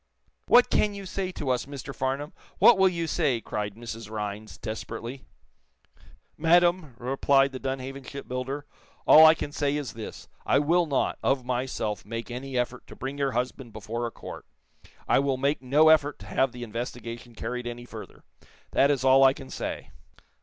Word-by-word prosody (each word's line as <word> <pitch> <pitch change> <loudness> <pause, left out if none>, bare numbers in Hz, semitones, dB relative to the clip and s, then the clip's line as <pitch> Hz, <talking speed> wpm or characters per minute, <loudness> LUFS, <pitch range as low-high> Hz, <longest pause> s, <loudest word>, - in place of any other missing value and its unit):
"What 245 0 +6
can 210 -1 +2
you 200 -1 -7
say 185 0 -3
to 140 -6 -2
us, 125 +1 -1
Mr. 140 -1 -7
Farnum? 135 +4 -2 0.2
What 240 - +7
will 190 0 +6
you 170 -2 -2
say?" 150 -7 +1
cried 105 -2 -4
Mrs. 115 -2 -8
Rhinds, 105 -4 -5
desperately. 115 - -6 1.1
"Madame," 175 -3 +3
replied 135 +2 +2
the 130 - -6
Dunhaven 135 +1 -4
shipbuilder, 135 +1 -5 0.4
"all 160 +1 +9
I 160 - +7
can 145 - -5
say 145 -1 0
is 145 -3 -5
this: 110 -1 -8 0.2
I - - +3
will 165 +4 +3
not, 140 -3 0
of 135 -2 +1
myself 125 -5 -2
make 115 +3 -6
any 130 +1 -5
effort 125 +1 -2
to - - -11
bring 135 +2 -5
your 135 -2 0
husband 125 -1 -3
before 110 +3 -4
a - - -7
court. - - -10 0.6
I - - +4
will 135 -1 0
make 140 +2 0
no 145 +5 +5
effort 150 -2 +4
to 100 - -12
have 125 +6 +1
the 125 0 -8
investigation 120 +1 -6
carried 125 +2 -4
any 120 0 -6
further. - - -11 0.5
That 140 - +4
is 140 -3 +1
all 135 +1 +6
I 135 0 +7
can 135 -1 -11
say. - - -5
130 Hz, 175 wpm, -27 LUFS, 120-145 Hz, 1.1 s, all